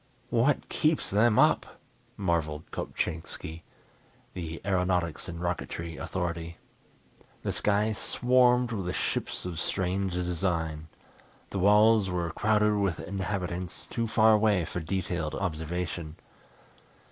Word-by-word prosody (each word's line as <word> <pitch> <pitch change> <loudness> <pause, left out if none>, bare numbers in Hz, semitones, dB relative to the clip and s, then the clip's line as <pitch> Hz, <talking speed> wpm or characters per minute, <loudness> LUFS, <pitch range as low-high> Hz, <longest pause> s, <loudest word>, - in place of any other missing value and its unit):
"What 125 +4 +2
keeps 155 0 +1
them 105 +2 +4
up!" - - +3 0.4
marvelled 80 -5 -1
Kopchainski, 80 0 -4 0.7
the 85 -2 -5
aeronautics 90 -4 0
and 85 0 -6
rocketry 85 -1 -3
authority. 85 -2 -3 0.9
The - - 0
sky 105 +1 +1
swarmed 125 +2 +3
with 95 -5 -2
ships - - -2
of 85 -3 -4
strange 95 +1 -1
design. 85 -3 -1 0.6
The 100 - -2
walls 105 +1 +5
were 85 -2 -1
crowded 105 +3 +2
with 100 -5 0
inhabitants, 90 -2 -3
too 115 -1 -1
far 110 0 +5
away 105 -5 +3
for 90 - -4
detailed 85 -2 -2
observation. 85 -2 -3
90 Hz, 110 wpm, -29 LUFS, 85-105 Hz, 0.9 s, walls